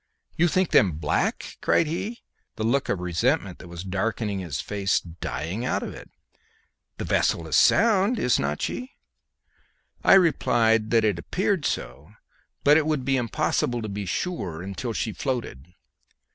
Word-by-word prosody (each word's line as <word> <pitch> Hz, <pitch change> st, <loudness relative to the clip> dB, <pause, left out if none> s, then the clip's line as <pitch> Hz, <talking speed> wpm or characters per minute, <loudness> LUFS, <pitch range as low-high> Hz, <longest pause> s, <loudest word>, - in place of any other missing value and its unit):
"You 175 Hz, -, +3 dB
think 185 Hz, +1 st, +1 dB
them 95 Hz, -5 st, +5 dB
black?" 75 Hz, 0 st, -2 dB
cried 170 Hz, -, +3 dB
he, 195 Hz, +9 st, -4 dB, 0.3 s
the 110 Hz, -, -4 dB
look 130 Hz, +5 st, +1 dB
of 95 Hz, -, 0 dB
resentment 95 Hz, -, 0 dB
that -, -, -11 dB
was 85 Hz, 0 st, -8 dB
darkening 100 Hz, +2 st, -2 dB
his 85 Hz, -7 st, -4 dB
face 100 Hz, -2 st, 0 dB
dying 85 Hz, +4 st, -5 dB
out 125 Hz, -, -1 dB
of -, -, -5 dB
it. -, -, -12 dB, 0.9 s
"The -, -, -4 dB
vessel 85 Hz, -, +1 dB
is 80 Hz, -, 0 dB
sound, 215 Hz, +1 st, +4 dB
is 125 Hz, -, +2 dB
not 75 Hz, +1 st, -2 dB
she?" 255 Hz, +2 st, -4 dB, 1.1 s
I -, -, +7 dB
replied 115 Hz, -, +3 dB
that 115 Hz, -1 st, +3 dB
she 110 Hz, -, +4 dB
appeared 170 Hz, -, -1 dB
so, -, -, -5 dB, 0.5 s
but 145 Hz, +1 st, +6 dB
it 155 Hz, -1 st, +1 dB
would 150 Hz, -5 st, -1 dB
be 135 Hz, -, +2 dB
impossible 120 Hz, -1 st, 0 dB
to 110 Hz, -, -4 dB
be 100 Hz, -1 st, -5 dB
sure 90 Hz, -, -3 dB
until 100 Hz, +5 st, -4 dB
she 110 Hz, 0 st, -2 dB
floated. 115 Hz, -, -4 dB
115 Hz, 160 wpm, -25 LUFS, 95-155 Hz, 1.1 s, I